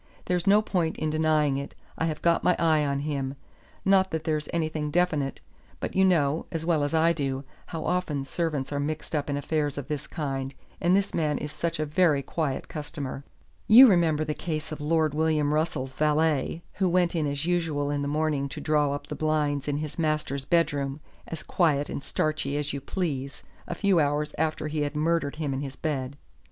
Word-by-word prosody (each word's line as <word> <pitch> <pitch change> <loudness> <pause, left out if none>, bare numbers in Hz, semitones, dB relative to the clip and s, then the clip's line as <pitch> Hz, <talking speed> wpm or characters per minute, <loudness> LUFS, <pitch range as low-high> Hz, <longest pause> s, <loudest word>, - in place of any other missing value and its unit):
There's 180 +1 0
no 205 +2 +6
point 175 -6 -1
in 155 -1 -1
denying 155 -3 +2
it. 140 +1 -6 0.2
I 160 - -1
have 155 -2 -3
got 170 -1 +3
my 180 - +4
eye 160 -2 +3
on 140 -1 0
him. 140 -2 -2 0.5
Not 190 -1 +4
that 160 -2 -3
there's 155 -2 -1
anything 155 -2 -1
definite; 150 -4 0 0.4
but - - -4
you 190 - +4
know, 160 -5 +2
as 165 -1 -3
well 165 -4 +2
as 145 +3 0
I 165 +1 +4
do, 135 -3 -2 0.2
how 165 -2 -5
often 165 -6 -1
servants 150 -2 -2
are 145 - -1
mixed 155 +2 -3
up 145 -1 -1
in 140 - 0
affairs 145 0 -1
of 140 -2 -5
this 150 -2 -3
kind, 135 -4 -3 0.3
and 175 +2 +4
this 200 0 +1
man 150 -3 +1
is 150 - -5
such 170 0 -3
a 155 - +1
very 150 -2 +2
quiet 150 -4 -2
customer. 145 -3 -5 0.4
You 240 +5 +10
remember 165 -6 +3
the 150 - -1
case 155 -1 -4
of 155 - -5
Lord 155 0 +2
William 150 -1 +1
Russell's 150 -4 -1
valet, 155 +2 +1
who 185 -1 +1
went 175 0 +2
in 155 -3 +1
as 140 +2 -2
usual 160 -5 0
in 145 -1 -1
the 140 - -1
morning 150 -2 0
to 145 - -6
draw 150 -2 +2
up 145 0 -5
the - - -6
blinds 150 -2 0
in 145 -1 0
his 155 +2 -5
master's 150 -4 -1
bedroom, 145 -4 +1 0.3
as 165 - -6
quiet 150 -5 +1
and 140 - -4
starchy 155 -2 -1
as 145 -1 -2
you 140 - -4
please, 140 -4 -3 0.2
a 175 - -3
few 195 -1 +3
hours 145 0 0
after 155 -1 0
he 150 0 -2
had 145 0 -2
murdered 160 -1 +1
him 150 -3 -2
in 135 - -2
his 135 -1 -6
bed. 140 -2 -3
155 Hz, 205 wpm, -27 LUFS, 145-165 Hz, 0.5 s, You